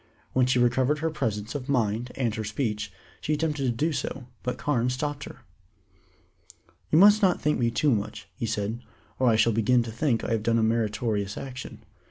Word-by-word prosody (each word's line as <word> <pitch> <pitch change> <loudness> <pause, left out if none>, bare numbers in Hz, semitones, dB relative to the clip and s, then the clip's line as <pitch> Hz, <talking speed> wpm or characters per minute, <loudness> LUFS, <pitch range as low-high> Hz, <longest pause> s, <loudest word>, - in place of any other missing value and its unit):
When 130 -1 +3
she 125 - +2
recovered 125 +4 +3
her 160 +2 -1
presence 110 -7 -2
of 140 -1 -5
mind 120 -2 0
and 120 -5 0
her 110 0 -3
speech, 105 -1 -2 0.3
she 155 - -1
attempted 150 -2 -1
to - - +2
do 155 +7 0
so, 135 -2 -4 0.2
but 125 - -3
Carne 125 -4 0
stopped 140 +2 -3
her. - - -11 1.5
"You 155 - +3
must 205 +4 +7
not 185 -3 +3
thank 150 -2 +1
me 120 -1 +2
too 140 +5 +2
much," 105 -2 -2
he 115 - -4
said, 110 +2 -2 0.4
"or 130 - +3
I 115 - +4
shall 110 +1 +3
begin 115 +3 +3
to 115 - -6
think 115 -1 0
I - - -3
have 115 -1 +1
done 115 +1 +2
a 115 - +2
meritorious 110 -2 0
action. 130 -2 -8
120 Hz, 200 wpm, -26 LUFS, 110-140 Hz, 1.5 s, must